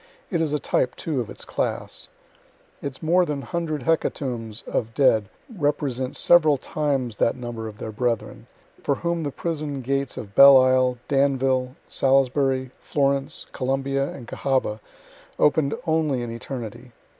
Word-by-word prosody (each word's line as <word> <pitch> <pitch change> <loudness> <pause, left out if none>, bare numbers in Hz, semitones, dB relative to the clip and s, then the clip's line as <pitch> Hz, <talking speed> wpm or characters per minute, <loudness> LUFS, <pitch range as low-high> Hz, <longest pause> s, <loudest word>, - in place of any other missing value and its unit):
It 170 -3 +1
is 155 -3 0
a 150 - +1
type, 125 -3 0
too, 150 -6 -2
of 115 - -6
its - - -7
class. - - -3 0.7
Its 140 +2 -6
more 175 +3 +4
than 145 -5 -3
hundred 160 -5 -3
hecatombs 120 -7 -1
of 115 -1 -2
dead 110 -8 +3 0.3
represent 140 -5 -1
several 155 -4 +5
times 135 -5 -2
that 115 - +2
number 120 -3 -6
of 105 -1 -9
their 110 - -6
brethren, 115 0 -2 0.3
for 140 - +1
whom 170 +2 -2
the 145 - -2
prison 150 -2 -4
gates 135 +1 -2
of 100 -2 -7
Belle 140 +3 +9
Isle, 130 -1 +3
Danville, 135 -2 +1
Salisbury, 135 -1 +2
Florence, 140 0 0
Columbia, 135 +1 -1
and 120 -4 -10
Cahaba 130 -6 -1 0.6
open'd 150 -1 +3
only 155 -6 +1
in 120 - -5
eternity. 115 0 -7
135 Hz, 145 wpm, -24 LUFS, 125-145 Hz, 0.7 s, Belle